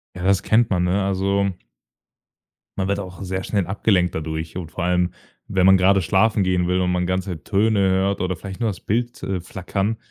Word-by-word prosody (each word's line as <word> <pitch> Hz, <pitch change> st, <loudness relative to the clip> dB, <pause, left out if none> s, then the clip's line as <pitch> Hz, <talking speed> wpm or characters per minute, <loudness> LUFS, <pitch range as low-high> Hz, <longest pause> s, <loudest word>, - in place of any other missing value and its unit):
Ja, 90 Hz, -, -6 dB
das 95 Hz, 0 st, +3 dB
kennt 115 Hz, +1 st, +3 dB
man, 90 Hz, -2 st, +2 dB
ne? 95 Hz, +3 st, +1 dB
Also 100 Hz, +1 st, +1 dB, 1.3 s
man 95 Hz, 0 st, -1 dB
wird 100 Hz, 0 st, 0 dB
auch 90 Hz, 0 st, -8 dB
sehr 95 Hz, 0 st, -3 dB
schnell 100 Hz, -5 st, -1 dB
abgelenkt 95 Hz, -3 st, +1 dB
dadurch. 80 Hz, +1 st, -4 dB
Und 85 Hz, -3 st, -6 dB
vor 90 Hz, -, -4 dB
allem, 90 Hz, 0 st, +1 dB, 0.4 s
wenn 95 Hz, -2 st, +2 dB
man 95 Hz, 0 st, +7 dB
grade 95 Hz, +1 st, +4 dB
schlafen 100 Hz, +3 st, +2 dB
gehen 90 Hz, -1 st, +1 dB
will 90 Hz, +1 st, +1 dB
und 90 Hz, -, +1 dB
man 90 Hz, 0 st, 0 dB
ganze 95 Hz, -3 st, -3 dB
Töne 105 Hz, +1 st, +2 dB
hört 95 Hz, +1 st, +2 dB
oder 90 Hz, 0 st, -1 dB
vielleicht 95 Hz, +3 st, -8 dB
nur 115 Hz, -, +1 dB
das 95 Hz, -, -6 dB
Bild, 120 Hz, +3 st, -2 dB
äh, 95 Hz, -1 st, -2 dB
flackern, 95 Hz, +5 st, -3 dB
95 Hz, 200 wpm, -22 LUFS, 90-100 Hz, 1.3 s, man